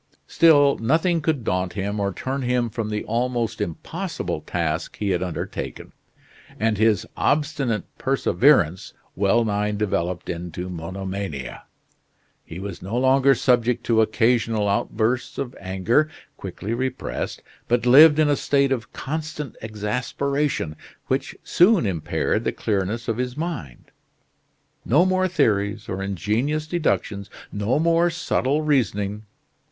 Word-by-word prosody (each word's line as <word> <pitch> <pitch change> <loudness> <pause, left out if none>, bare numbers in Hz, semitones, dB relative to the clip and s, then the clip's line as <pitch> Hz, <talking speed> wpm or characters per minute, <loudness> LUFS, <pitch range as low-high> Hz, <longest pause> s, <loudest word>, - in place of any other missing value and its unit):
Still, 145 -4 +5
nothing 160 +8 +2
could 150 -5 0
daunt 90 -2 -1
him 100 +1 -3
or 100 -1 0
turn 135 +7 -3
him 125 -2 0
from 110 -1 -3
the 105 0 -2
almost 115 -1 -1
impossible 85 -6 -4
task 80 -2 -3
he 100 -2 -1
had 90 -1 0
undertaken, 90 -3 -5 0.7
and 110 -1 +1
his 110 -4 +3
obstinate 140 -7 0 0.2
perseverance 130 - +2 0.2
well 105 +4 +2
nigh 105 0 0
developed 95 -4 -2
into 90 +1 -5
monomania. 95 -5 -5 0.8
He 80 - -9
was 100 -2 -6
no 100 +6 -3
longer 135 +1 +4
subject 120 -1 +2
to 115 -2 +3
occasional 115 -1 +2
outbursts 110 +4 0
of 130 -2 -4
anger, 100 +11 +1 0.3
quickly 100 +3 -5
repressed; 130 +1 -3 0.2
but 120 0 +1
lived 145 +5 +8
in 155 -1 +4
a 145 - +3
state 140 -1 +1
of 125 -3 -2
constant 150 -2 -5
exasperation, 115 - -2 0.3
which - - -1
soon 180 - +4
impaired 85 -6 -1
the - - 0
clearness 105 +3 -2
of 115 -2 -1
his 125 +1 -3
mind. 150 - -5 0.9
No 150 +10 +4
more 185 0 +2
theories, 105 - 0
or 95 0 -4
ingenious 110 - -1
deductions, 125 - -1 0.2
no 105 +6 0
more 170 +2 +3
subtle 155 -3 0
reasoning. 105 -7 0
115 Hz, 125 wpm, -23 LUFS, 100-140 Hz, 0.9 s, lived